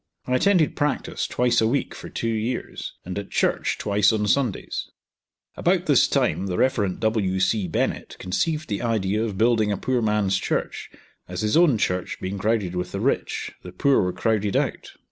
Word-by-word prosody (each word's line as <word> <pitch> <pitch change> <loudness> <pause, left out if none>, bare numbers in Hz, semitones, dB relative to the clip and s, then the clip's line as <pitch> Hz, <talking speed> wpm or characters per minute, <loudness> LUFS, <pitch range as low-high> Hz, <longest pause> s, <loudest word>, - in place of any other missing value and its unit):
I 125 - -2
attended 180 +1 +3
practice 150 -1 -1
twice 120 -2 +2
a 110 - +3
week 135 +5 -1
for - - -9
two 115 - -3
years, 115 +3 -3
and 90 +2 -4
at 100 - -8
church - - 0
twice 100 -1 +3
on 105 -1 0
Sundays. 120 -1 -1 0.7
About - - +1
this - - +5
time 100 - 0
the 90 -2 -2
Rev. 110 -8 +1
W. 105 -4 0
C. 95 +1 +1
Bennett 80 - -2
conceived 155 - -1
the 105 -2 -2
idea 110 -3 0
of 105 -4 -3
building 110 -1 +3
a 100 - -1
poor 125 +4 0
man's 105 -3 +1
church, - - -3 0.4
as 90 0 -5
his 105 0 +1
own 165 -8 +5
church 90 -3 -1
being 95 +2 -4
crowded 105 -4 0
with 90 0 -3
the - - -2
rich, - - -1
the 90 - -9
poor 135 +9 +3
were 90 -1 0
crowded 105 +1 0
out. - - -1
105 Hz, 185 wpm, -24 LUFS, 95-120 Hz, 0.7 s, this